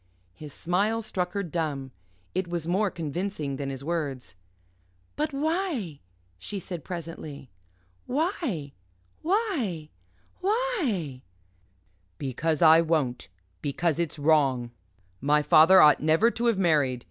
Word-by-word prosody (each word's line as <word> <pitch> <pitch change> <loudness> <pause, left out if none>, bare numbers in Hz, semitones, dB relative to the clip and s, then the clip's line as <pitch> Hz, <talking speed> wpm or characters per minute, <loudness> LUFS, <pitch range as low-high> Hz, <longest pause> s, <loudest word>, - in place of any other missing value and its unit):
His 150 +8 -10
smile 205 +9 0
struck 180 -4 -3
her 200 -1 -1
dumb. 150 -6 -3 0.4
It 185 0 -1
was 170 -2 -3
more 195 +4 +2
convincing 160 -3 -4
than 140 -1 -3
his 135 0 -6
words. 140 - -3 0.8
"But 305 +1 -1
why?" 290 - -2 0.4
she 200 - -5
said 175 -4 -6
presently. 165 -5 -7 0.6
"Why 255 - -2 0.5
why 310 - -1 0.5
why?" 360 - -1 1.0
"Because 150 +4 -1
I 160 0 +8
won't; 145 -10 -1 0.3
because 160 +3 -1
it's 170 -2 -2
wrong. 140 -5 +2 0.5
My 150 +2 +3
father 160 +5 +7
ought 150 -3 +7
never 160 +10 +4
to 235 +1 -1
have 230 -4 +2
married. 150 -9 +2
165 Hz, 115 wpm, -27 LUFS, 145-205 Hz, 1.0 s, I